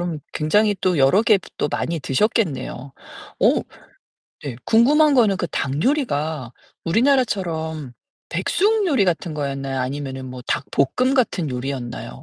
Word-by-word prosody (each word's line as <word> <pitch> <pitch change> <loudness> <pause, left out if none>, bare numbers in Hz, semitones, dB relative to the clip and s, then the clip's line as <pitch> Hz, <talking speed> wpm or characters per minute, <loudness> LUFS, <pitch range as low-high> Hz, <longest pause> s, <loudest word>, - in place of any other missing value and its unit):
그럼 175 -3 -3
굉장히 205 +7 +2
또 180 -4 +1
여러 135 +10 +4
개 215 -3 +4 0.2
또 - - -1
많이 165 +2 -2
드셨겠네요. 140 - -1 0.5
오 - - +4 0.8
네 135 -5 -4
궁금한 290 +6 +5
거는 220 -7 +4
그 175 - -1
닭 140 +1 -2
요리가 155 - -1 0.3
우리나라처럼 170 - 0 0.4
백숙 420 +2 +1
요리 275 - +3
같은 170 -1 -1
거였나요 135 -2 -3
아니면은 135 0 -4
뭐 125 -1 -8
닭볶음 255 - 0
같은 210 - +1
요리였나요? 125 -1 -5
160 Hz, 295 characters per minute, -21 LUFS, 135-225 Hz, 0.8 s, 궁금한